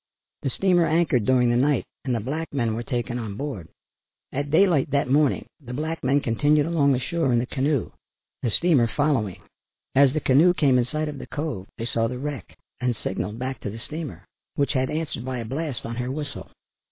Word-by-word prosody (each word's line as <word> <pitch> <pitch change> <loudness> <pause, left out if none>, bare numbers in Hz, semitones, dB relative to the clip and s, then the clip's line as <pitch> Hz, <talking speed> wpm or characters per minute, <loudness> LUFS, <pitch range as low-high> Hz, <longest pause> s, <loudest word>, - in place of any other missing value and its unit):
The 135 - -1
steamer 175 +3 +3
anchored 155 -8 +2
during 125 -1 +4
the - - +2
night 140 +2 +2 0.2
and 130 -3 +1
the - - 0
black 150 +9 -4
men 120 -6 0
were 115 - -2
taken 120 0 -2
on 105 -4 -5
board. 130 - -5 0.6
At 145 +2 -2
daylight 160 -3 +4
that 140 -2 +1
morning 145 0 +3 0.2
the 125 -1 -6
black 160 +3 -3
men 135 +3 +3
continued 145 +4 +2
along 150 -4 +3
the 125 - +1
shore 135 +2 0
in 120 - +3
the 120 - +1
canoe, 135 +1 0 0.5
the 120 - 0
steamer 140 -1 +4
following. 130 -8 0 0.5
As 135 0 +6
the 155 - +1
canoe 155 +6 +5
came 135 -6 +4
in 120 - +2
sight 155 +5 -2
of 145 -2 -5
the - - -8
cove 145 -11 -4
they 115 - -3
saw 115 -1 0
the 125 +2 -4
wreck 140 - -6 0.2
and 125 -1 0
signalled 105 +3 -3
back 130 +1 -4
to - - -4
the 105 - -7
steamer, 125 - -7 0.3
which 140 0 +1
had 130 -1 +1
answered 155 -6 -3
by 130 0 -3
a 115 - -4
blast 140 +1 -3
on 115 0 -5
her 125 0 -2
whistle. 145 +1 -5
135 Hz, 210 wpm, -25 LUFS, 120-150 Hz, 0.6 s, As